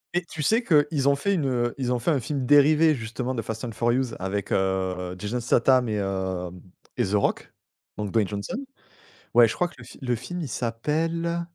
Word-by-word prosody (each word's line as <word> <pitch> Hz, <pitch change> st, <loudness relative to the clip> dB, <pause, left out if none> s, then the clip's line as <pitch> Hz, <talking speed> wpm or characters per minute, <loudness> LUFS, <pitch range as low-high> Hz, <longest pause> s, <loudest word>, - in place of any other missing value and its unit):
Mais 175 Hz, -, +3 dB
tu 160 Hz, -3 st, -6 dB
sais 225 Hz, -, +3 dB
qu'ils 145 Hz, -, +3 dB
ont 140 Hz, -, +4 dB
fait 200 Hz, +8 st, 0 dB
une, 150 Hz, -7 st, 0 dB
heu, 120 Hz, -2 st, 0 dB
ils 125 Hz, -1 st, -1 dB
ont 125 Hz, -, +2 dB
fait 120 Hz, +8 st, 0 dB
un 140 Hz, -, +2 dB
film 135 Hz, +1 st, -3 dB
dérivé 150 Hz, +3 st, +5 dB
justement 120 Hz, +1 st, -4 dB
de 115 Hz, -, -2 dB
Fast 110 Hz, +1 st, -6 dB
and 115 Hz, -, -4 dB
Furious 120 Hz, +2 st, 0 dB
avec, 95 Hz, +1 st, -3 dB
heu, 95 Hz, -1 st, -1 dB
Jason 105 Hz, +6 st, -3 dB
Statham 125 Hz, 0 st, +3 dB
et 105 Hz, -, -1 dB
hem 95 Hz, -3 st, -3 dB, 0.4 s
et -, -, +2 dB
The 100 Hz, -, -2 dB
Rock, 100 Hz, -, 0 dB, 0.5 s
donc 105 Hz, -2 st, -3 dB
Dwayne 110 Hz, -4 st, +2 dB
Johnson, 100 Hz, -, -4 dB, 0.8 s
ouais, 120 Hz, -1 st, +7 dB
je -, -, -3 dB
crois 180 Hz, -, 0 dB
que 165 Hz, -, -18 dB
le 120 Hz, -, -11 dB
fi -, -, -13 dB
le 125 Hz, -1 st, 0 dB
film 175 Hz, +9 st, -6 dB
il 145 Hz, -, -4 dB
s'appelle? 165 Hz, +9 st, -1 dB
120 Hz, 215 wpm, -25 LUFS, 105-150 Hz, 0.8 s, ouais